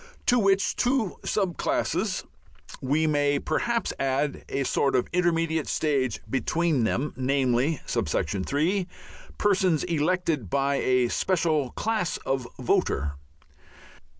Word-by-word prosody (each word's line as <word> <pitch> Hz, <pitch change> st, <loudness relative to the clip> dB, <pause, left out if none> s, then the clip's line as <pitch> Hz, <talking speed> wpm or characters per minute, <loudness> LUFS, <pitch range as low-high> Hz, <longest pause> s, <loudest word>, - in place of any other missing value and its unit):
To 245 Hz, -, +4 dB
which 195 Hz, -2 st, +2 dB
two 245 Hz, -6 st, +1 dB
sub 190 Hz, -5 st, -1 dB
classes -, -, -1 dB, 0.6 s
we 145 Hz, +4 st, +1 dB
may 145 Hz, -2 st, +2 dB
perhaps 230 Hz, +11 st, -1 dB
add 135 Hz, +2 st, -1 dB
a 140 Hz, -, -1 dB
sort 135 Hz, +1 st, +1 dB
of 125 Hz, -, +1 dB
intermediate 165 Hz, -3 st, +1 dB
stage 135 Hz, -6 st, 0 dB
between 145 Hz, +2 st, +1 dB
them, 135 Hz, +6 st, -1 dB
namely: 130 Hz, +2 st, +1 dB
(3) 140 Hz, -, 0 dB, 0.5 s
persons 190 Hz, -6 st, +2 dB
elected 165 Hz, -, 0 dB
by 140 Hz, +5 st, +1 dB
a 125 Hz, -2 st, +2 dB
special 160 Hz, -6 st, +1 dB
class 215 Hz, -5 st, -1 dB
of 135 Hz, -2 st, -1 dB
voter. 75 Hz, -1 st, 0 dB
150 Hz, 110 wpm, -26 LUFS, 130-180 Hz, 0.6 s, To